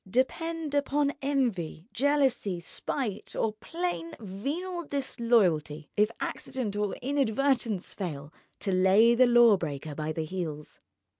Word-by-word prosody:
Depend 315 - -1
upon 285 0 +1
envy, 230 - -1
jealousy, 270 -9 +1
spite, 210 - -4
or 220 - 0
plain 335 +7 -4
venal 295 - -4
disloyalty, 230 - +1
if 210 +1 +4
accident 230 -6 -3
or 205 -1 -1
inadvertence 265 -5 +1
fail, 155 -6 -5 0.3
to 195 - -1
lay 190 +5 +5
the 255 +1 +5
law 240 -3 +7
breaker 150 -3 -5
by 155 +1 -3
the 155 0 -3
heels. 155 -4 -5
225 Hz, 120 wpm, -28 LUFS, 185-280 Hz, 0.3 s, law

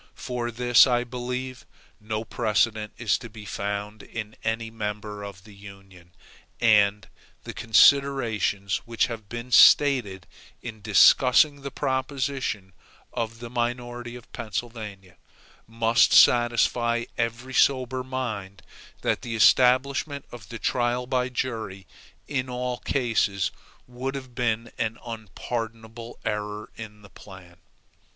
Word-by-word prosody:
For 125 -2 -4
this 120 +2 +5
I 120 -1 +1
believe, 125 +1 -5 0.4
no 110 +1 -4
precedent 110 -1 0
is 110 -5 +1
to 120 -1 -9
be 105 -1 -11
found 105 +1 -4
in 110 -1 -7
any 115 0 -2
member 105 -1 -5
of 100 -2 -9
the 105 -1 -15
Union; 95 -3 -15 0.4
and 105 -3 +3 0.4
the - - -7
considerations 115 -5 +3
which 115 -1 +1
have 110 -4 -8
been 120 +1 -7
stated 120 -11 +5 0.3
in 110 -3 -9
discussing 130 +7 +5
the 140 - -5
proposition 130 -7 -2 0.4
of 115 -1 -4
the 120 - -7
minority 120 0 -3
of 125 - -13
Pennsylvania, 105 -4 -6 0.5
must 115 +1 +3
satisfy 120 0 +4
every 120 +3 -3
sober 130 -1 +2
mind 110 -7 -5 0.4
that - - 0
the 115 -2 -5
establishment 135 +5 +3
of 120 -3 -11
the 115 - -6
trial 125 +1 0
by 125 0 0
jury 110 -7 -4 0.4
in 130 -3 -2
all 125 0 -3
cases 110 -7 0 0.3
would 130 +2 -5
have 130 -2 -8
been 115 -2 -1
an 115 0 -1
unpardonable 115 +1 -6
error 105 -1 -4
in 105 -1 -10
the 100 - -14
plan. 90 -3 -14
115 Hz, 120 wpm, -25 LUFS, 105-125 Hz, 0.5 s, this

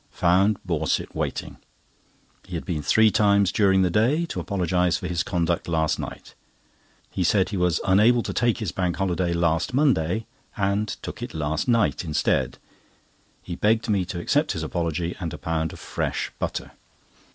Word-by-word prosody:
Found 95 +4 +3
Borset 80 -3 -1
waiting. - - -4 0.9
He 90 - -7
had 80 - -4
been 80 -5 -2
three 110 +6 +4
times 100 -1 +3
during 95 -3 +3
the 90 - +1
day 130 - +2
to - - -3
apologise 90 -2 0
for 90 - -5
his 85 -1 -1
conduct 85 -1 -1
last 80 -2 0
night. - - -7 0.8
He 95 - -1
said 95 +2 +2
he 105 - -4
was 90 -3 +2
unable 110 +5 +4
to - - -4
take 120 -1 +1
his 105 -7 -3
Bank 90 -2 -1
Holiday 90 -2 0
last 85 +6 0
Monday, 110 - +2 0.3
and 100 +1 0 0.2
took - - -7
it - - -6
last 80 +3 -1
night 115 -6 +2
instead. 80 -3 0 0.9
He 85 - -5
begged 110 +5 +1
me 100 -3 +2
to 90 -1 -5
accept - - +1
his - - -4
apology, 85 0 -2
and 85 -4 -4
a - - -8
pound 80 -1 -2
of - - -11
fresh - - -3
butter. - - -3
90 Hz, 170 wpm, -24 LUFS, 85-105 Hz, 0.9 s, three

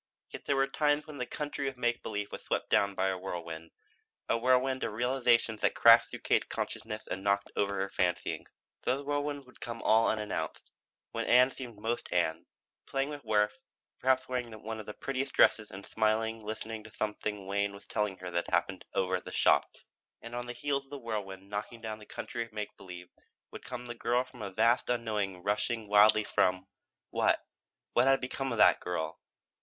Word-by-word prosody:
Yet - - -9
there 140 - +2
were 135 0 +4
times 145 +2 +1
when 150 -3 -9
the 125 - -2
country 145 -1 -3
of 135 -1 -4
make 120 -1 0
believe 105 0 -4
was - - -6
swept - - -2
down 100 -1 +3
by 95 0 +1
a 95 - -1
whirlwind, 85 -3 -6 0.6
a - - +2
whirlwind 130 +2 +2
of 105 - -2
realization 120 -2 +2
which - - +2
crashed - - +8
through - - -8
Katie's - - +2
consciousness 110 -1 -4
and 95 - -4
knocked 100 0 +1
over 100 -1 +1
the - - -2
fancyings. 90 -1 -1 0.3
Those 135 +3 0
whirlwinds 145 -1 -2
would 125 - -19
come 115 -1 -5
all 110 +1 +5
unannounced; 105 -2 -3 0.4
when - - -2
Ann 125 +2 +6
seemed 120 -5 -8
most 115 +3 -3
Ann, - - 0 0.4
playing 135 +1 -1
with 145 -1 -7
Worth, 105 -2 +2 0.4
perhaps 130 0 +2
wearing 125 -2 -2
one 110 0 -4
of 110 - -8
the 105 - -6
prettiest 135 0 -3
dresses 110 -1 +5
and 95 +1 -9
smilingly 110 +1 0
listening 110 +1 -5
to 110 - -12
something 105 -2 -3
Wayne 100 +1 0
was 100 - -13
telling 105 -3 -1
her 90 -1 -7
had 85 0 -1
happened - - 0
over 95 -1 +2
at - - -12
the - - -7
shops. - - +2 0.4
And 115 - -8
on 120 0 -4
the 120 - -4
heels 140 0 -1
of - - -26
the 145 - -6
whirlwind 100 -6 -5
knocking 105 +3 -5
down 110 -1 -5
the 105 - -13
country 120 - -5
of 115 - -13
make 105 -1 -5
believe 90 -2 -10 0.4
would - - -9
come 125 -1 -6
the 120 - -5
girl 120 +1 +1
from 125 -2 -13
a 100 - -3
vast 115 +6 +2
unknown 105 -6 -1
rushing 105 +2 -1
wildly 105 +1 +6
from 90 -2 +1 0.5
what? - - +3 0.5
What 120 - +5
had 135 0 +5
become 135 +1 -3
of 115 - -2
that - - +6
girl? 90 -3 -3
110 Hz, 200 wpm, -31 LUFS, 100-125 Hz, 0.6 s, crashed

